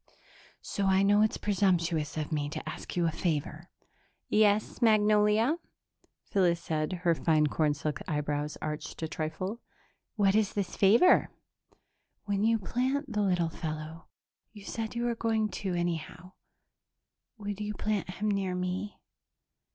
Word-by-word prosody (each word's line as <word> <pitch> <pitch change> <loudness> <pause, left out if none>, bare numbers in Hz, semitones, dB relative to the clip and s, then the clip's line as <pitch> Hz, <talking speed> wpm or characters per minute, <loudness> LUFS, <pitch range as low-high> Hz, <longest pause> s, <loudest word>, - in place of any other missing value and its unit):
"So 200 -1 -1
I 190 0 +4
know 205 +1 +4
it's 215 - +2
presumptuous 175 -6 0
of 155 0 -3
me 145 -2 -1
to - - -6
ask - - -6
you 175 -1 +2
a 165 - +1
favor." 160 0 -3 0.6
"Yes, 215 +2 +2
Magnolia?" 215 +4 +4 0.7
Phyllis 175 -4 +2
said, 155 -1 -2
her 170 -2 +4
fine 155 -1 +2
cornsilk 150 0 0
eyebrows 150 -1 -2
arched 155 +1 -5
a - - 0
trifle. 160 +8 -4 0.5
"What 200 -3 +3
is 215 -2 +2
this 200 -3 -3
favor?" 225 - +5 1.0
"When 200 0 0
you 225 +1 +4
plant 255 +6 -2
the 210 - +1
little 180 -4 +1
fellow 160 0 -6 0.4
you 205 -2 -13
said 225 0 -4
you 235 - -1
were 240 0 +1
going 225 -2 0
to, 190 -4 -3
anyhow 175 +1 -3 1.1
would 205 -1 -5
you 210 0 -3
plant 210 -3 -2
him 210 +4 -1
near 195 -2 -1
me?" 180 +3 -3
190 Hz, 140 wpm, -29 LUFS, 160-210 Hz, 1.1 s, favor